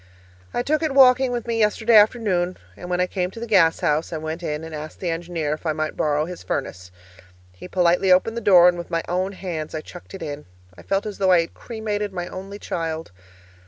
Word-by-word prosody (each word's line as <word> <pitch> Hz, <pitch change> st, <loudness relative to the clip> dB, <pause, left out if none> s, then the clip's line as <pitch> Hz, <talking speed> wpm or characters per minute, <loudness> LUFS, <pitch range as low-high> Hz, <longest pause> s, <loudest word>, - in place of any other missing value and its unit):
I 245 Hz, -, -1 dB
took 305 Hz, +4 st, 0 dB
it 310 Hz, -4 st, -1 dB
walking 260 Hz, -1 st, +6 dB
with 240 Hz, -2 st, -3 dB
me 230 Hz, -1 st, -1 dB
yesterday 220 Hz, +2 st, +3 dB
afternoon, 205 Hz, -5 st, +3 dB, 0.2 s
and 175 Hz, -, -9 dB
when 180 Hz, 0 st, 0 dB
I 180 Hz, -, +3 dB
came 180 Hz, -1 st, -2 dB
to 225 Hz, -, -10 dB
the 235 Hz, -, -4 dB
gas 185 Hz, -8 st, +3 dB
house, 150 Hz, +2 st, 0 dB
I 165 Hz, -, -3 dB
went 160 Hz, +2 st, -5 dB
in 150 Hz, -2 st, -3 dB
and 160 Hz, 0 st, -8 dB
asked 155 Hz, 0 st, -7 dB
the 175 Hz, -3 st, -2 dB
engineer 165 Hz, -2 st, -3 dB
if 155 Hz, -, -7 dB
I 160 Hz, -2 st, 0 dB
might 155 Hz, 0 st, -3 dB
borrow 150 Hz, 0 st, +1 dB
his 180 Hz, 0 st, -8 dB
furnace. 95 Hz, -9 st, -4 dB, 0.6 s
He 90 Hz, -, -11 dB
politely 180 Hz, +1 st, +2 dB
opened 185 Hz, +5 st, +3 dB
the 235 Hz, -, -3 dB
door, 180 Hz, -4 st, +7 dB
and 175 Hz, -1 st, +2 dB
with 170 Hz, -, -7 dB
my 165 Hz, -1 st, -1 dB
own 185 Hz, +3 st, -1 dB
hands 165 Hz, -5 st, -5 dB
I 155 Hz, -, -3 dB
chucked 175 Hz, +4 st, -12 dB
it 190 Hz, -, -7 dB
in. 145 Hz, -, -6 dB, 0.3 s
I -, -, -13 dB
felt 195 Hz, +1 st, -1 dB
as 210 Hz, -2 st, -6 dB
though 190 Hz, -1 st, +3 dB
I 175 Hz, -2 st, +6 dB
had 165 Hz, -, -7 dB
cremated 210 Hz, -3 st, -4 dB
my 175 Hz, -1 st, -4 dB
only 195 Hz, +2 st, -8 dB
child! 165 Hz, -, -4 dB
180 Hz, 235 wpm, -22 LUFS, 160-210 Hz, 0.6 s, door